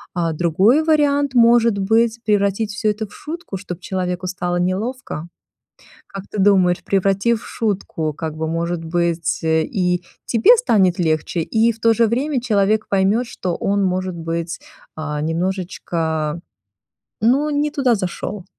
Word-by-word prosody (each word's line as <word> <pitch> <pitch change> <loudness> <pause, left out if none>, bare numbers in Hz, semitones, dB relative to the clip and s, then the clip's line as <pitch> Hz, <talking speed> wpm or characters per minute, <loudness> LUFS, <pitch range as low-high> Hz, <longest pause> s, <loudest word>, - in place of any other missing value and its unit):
А 165 -2 0
другой 190 - +3
вариант 285 -3 +2
может 235 -2 +5
быть- 225 +3 +1
превратить 205 0 +1
всё 215 0 0
это 215 +1 -4
в - - -18
шутку, 325 - -7
чтоб 180 -3 -7
человеку 185 -1 -3
стало 180 -1 -2
неловко. 185 - -3 0.8
Как 195 -1 -8
ты 210 - -4
думаешь, 185 -3 +3
превратив 195 +4 +1
в - - -11
шутку, 190 -8 -2
как 155 +1 -5
бы, 160 0 -2
может 165 +1 -2
быть, 170 -1 -1
э, 160 0 +2
и 180 -3 -1 0.2
тебе 235 - +5
станет 190 - +2
легче, 160 +1 0
и 225 +7 +2
в 225 - -19
то 230 0 +4
же 230 +1 +3
время 265 +4 0
человек 215 -2 +1
поймет, 200 +5 +2
что 180 -6 -4
он, 200 0 0
может 185 -1 -1
быть, 165 0 -4 0.4
а, 150 -1 -4
немножечко, 165 -2 -2 0.8
ну, 270 +7 +2
не 295 0 0
туда 260 -4 +2
зашёл. 185 +1 -4
195 Hz, 150 wpm, -20 LUFS, 170-230 Hz, 0.8 s, может